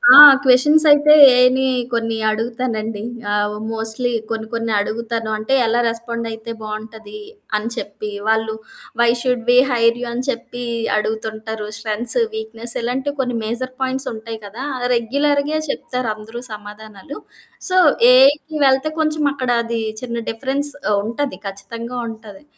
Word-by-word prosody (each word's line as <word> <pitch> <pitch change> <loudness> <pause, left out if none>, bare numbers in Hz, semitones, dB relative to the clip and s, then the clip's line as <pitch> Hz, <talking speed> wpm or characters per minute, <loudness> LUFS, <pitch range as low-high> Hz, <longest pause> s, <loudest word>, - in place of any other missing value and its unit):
ఆ! - - +10 0.3
క్వెషన్స్ 295 +5 +6
అయితే 295 +1 +6 0.2
ఏఐని 250 +1 +3 0.3
కొన్ని 230 -1 -1
అడుగుతానండి. 225 -1 -3 0.3
ఆ! - - +1 0.4
మోస్ట్‌లీ 225 +2 -1 0.2
కొన్ని 225 -1 -4
కొన్ని 230 -1 -2
అడుగుతాను. 225 +1 -3
అంటే, 220 +5 -3
ఎలా 230 +1 +1
రెస్పాండయితే 230 -1 -5
బావుంటది? 220 - -8 0.4
అని 215 +2 -4
చెప్పి, 210 -1 -6 0.2
వాళ్ళు 220 0 +1 0.5
why 235 - +4
should 250 -2 -1
we 245 - +5
hire 230 -1 +2
you? - - -3
అని 245 +2 -3
చెప్పి 245 0 -5 0.3
అడుగుతుంటారు. 220 0 -4
స్ట్రెంథ్స్, 225 - 0 0.2
వీక్‌నెస్ 240 - +1
ఇలాంటివి 265 +4 -3
కొన్ని 250 -2 -1
మేజర్ 240 +4 -3
పాయింట్స్ 265 +1 -1
ఉంటాయి 225 0 -8
కదా! 220 +6 -8
ఆ! - - -7 0.2
రెగ్యులర్‌గే 285 +5 0
చెప్తారు 250 -4 -3
అందరూ 225 +3 -9
సమాధానాలు. 210 +4 -10 0.5
సో, 370 - +1 0.4
ఏఐకి 290 +4 +4
వెళ్తే 270 +3 +2
కొంచెం 310 -1 0
అక్కడ 255 -3 -4
అది 230 0 -3 0.2
చిన్న 235 -2 -5
డిఫరెన్స్ 275 +5 -1 0.2
ఆహ్, 205 - +2
ఉంటది. 265 +5 -3
ఖచ్చితంగా 230 +5 -7
ఉంటాది. 220 -1 -12
235 Hz, 135 wpm, -19 LUFS, 220-260 Hz, 0.5 s, ఆ